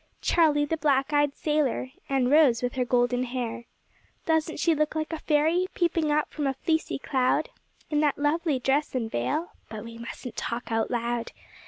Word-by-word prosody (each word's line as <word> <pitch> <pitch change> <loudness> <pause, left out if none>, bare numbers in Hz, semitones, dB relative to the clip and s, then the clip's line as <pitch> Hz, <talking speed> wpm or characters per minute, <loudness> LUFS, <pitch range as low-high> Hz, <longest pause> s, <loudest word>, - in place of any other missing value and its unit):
Charlie, 300 -3 +3
the 320 +2 -2
black 280 -2 +1
eyed 290 -1 +2
sailor, 295 -4 0 0.2
and 265 -2 +1
Rose 280 -6 +5
with 245 - -1
her 255 - 0
golden 245 0 +2
hair. 240 -2 -4 0.6
Doesn't 320 0 +1
she 335 - +3
look 305 0 0
like 315 +1 -2
a 320 - -3
fairy 320 +5 +2
peeping 335 -3 +1
out 300 +1 +1
from 295 -2 -2
a 270 - -1
fleecy 320 +4 -1
cloud, 265 - +1 0.4
In 300 - +2
that 295 -2 +2
lovely 300 +1 +1
dress 270 +3 0
and 225 -3 -2
veil? 125 - -1 0.2
But 215 -1 -7
we 230 0 -10
mustn't 235 +1 -7
talk 235 +1 -4
out 225 0 0
loud. 235 -1 -2
280 Hz, 180 wpm, -27 LUFS, 245-310 Hz, 0.6 s, Rose